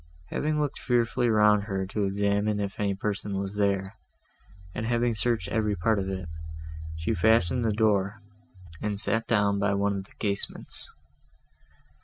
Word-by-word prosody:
Having 150 0 0
looked 145 -2 -1
fearfully 120 0 +2
round 105 -2 +5
her, 95 -2 -2
to 100 +1 -1
examine 100 +1 +1
if 100 -1 -3
any 100 -1 +1
person 100 0 -2
was 100 0 -3
there, 100 0 0 0.7
and - - -3
having 120 0 +2
searched 115 -3 0
every 105 -2 +1
part 100 +4 +2
of 95 0 -2
it, 95 -3 -4 0.7
she 80 +7 -1
fastened 110 +4 +3
the 110 - +2
door, 105 -2 +2 0.6
and 105 -2 -2
sat 115 +1 0
down 105 -3 +2
by 100 0 +2
one 100 0 +1
of 95 -1 -4
the - - -20
casements. 100 -2 -2
105 Hz, 155 wpm, -28 LUFS, 100-110 Hz, 0.7 s, round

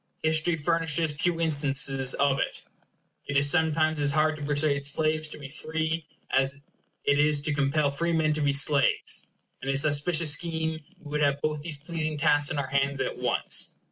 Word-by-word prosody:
History 160 +2 +2
furnishes 165 -1 +1
few 165 +3 -1
instances 140 -4 0
of 140 -1 +1
it. - - -3 0.6
It 145 - 0
is 140 0 +4
sometimes 160 -2 +1
as 145 -1 +1
hard 155 0 +2
to 150 - -10
persuade 145 -1 +1
slaves 155 +2 0
to 155 - -4
be 145 -2 -9
free, 160 +2 -2 0.2
as 135 +1 +1 0.4
it 145 0 +2
is 150 0 +3
to 150 +1 0
compel 140 +1 +1
freemen 160 0 0
to 155 - -2
be 145 -1 +2
slaves; 140 0 +1 0.3
and 135 - -5
in - - +2
this 140 +3 +4
auspicious 155 +2 +3
scheme 160 0 -3
we 150 0 -5
should - - +2
have 140 -1 +1
both 150 -1 -1
these 155 -1 -4
pleasing 155 0 -3
tasks 145 0 +2
on 155 - -3
our 140 -2 -2
hands 140 0 0
at 130 - -3
once. - - 0
150 Hz, 185 wpm, -27 LUFS, 140-160 Hz, 0.6 s, is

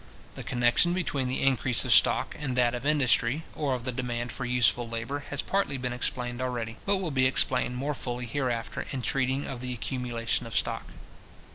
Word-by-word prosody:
The - - -7
connection 120 +8 +3
between 145 -7 -1
the 130 - -2
increase 130 -3 +4
of - - +4
stock - - +4
and 135 -4 -2
that 120 -1 +3
of 125 +3 -3
industry, 140 -1 +2
or 140 -4 -1
of 120 -1 -6
the 130 - -1
demand 120 -1 -3
for 130 - -5
useful 120 -1 +2
labour, 120 +5 -4
has 145 - -1
partly 195 -8 0
been 125 -1 -2
explained 125 0 -3
already, 120 -3 -3
but 200 0 +3
will 185 -4 -3
be 130 -1 +3
explained 125 -1 +2
more 140 +4 -2
fully 125 -2 -4
hereafter, 120 -2 -3
in 130 -2 -4
treating 135 +2 0
of 125 -2 -6
the 125 0 -3
accumulation 120 -1 -2
of 115 - -2
stock. - - 0
125 Hz, 190 wpm, -28 LUFS, 120-135 Hz, -, increase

